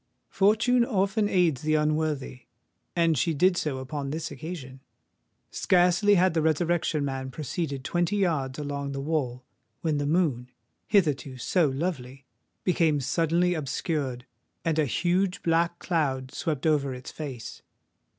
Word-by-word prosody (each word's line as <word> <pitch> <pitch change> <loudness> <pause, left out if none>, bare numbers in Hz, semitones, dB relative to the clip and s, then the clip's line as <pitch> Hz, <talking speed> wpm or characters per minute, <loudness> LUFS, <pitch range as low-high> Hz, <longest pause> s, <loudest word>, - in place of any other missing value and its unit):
Fortune 225 +5 +3
often 205 -2 +1
aids 170 -9 +2
the 155 0 +1
unworthy; 150 -5 -1 0.5
and 165 -2 +3
she 160 +4 +1
did 180 +5 +4
so 150 -6 -1
upon 135 +2 -4
this 155 +2 -4
occasion. 140 -2 -7 0.7
Scarcely 180 +3 +3
had 185 -1 +3
the 165 - +1
Resurrection 160 -1 +1
Man 135 -1 -3
proceeded 140 +1 -4
twenty 175 +6 0
yards 155 -10 0
along 140 -1 -4
the 135 - -4
wall, 135 -4 -2 0.4
when 155 -3 0
the 145 - -1
moon—hitherto 145 - 0
so 160 +4 +2
lovely—became 145 +2 -2
suddenly 165 +6 +1
obscured; 140 -4 -2 0.4
and 160 -1 +1
a 155 - +3
huge 180 - 0
black 170 +1 +2
cloud 135 -8 -1
swept 155 -4 -2
over 140 -4 +2
its 125 - -9
face. 130 -8 -7
155 Hz, 130 wpm, -27 LUFS, 135-175 Hz, 0.7 s, did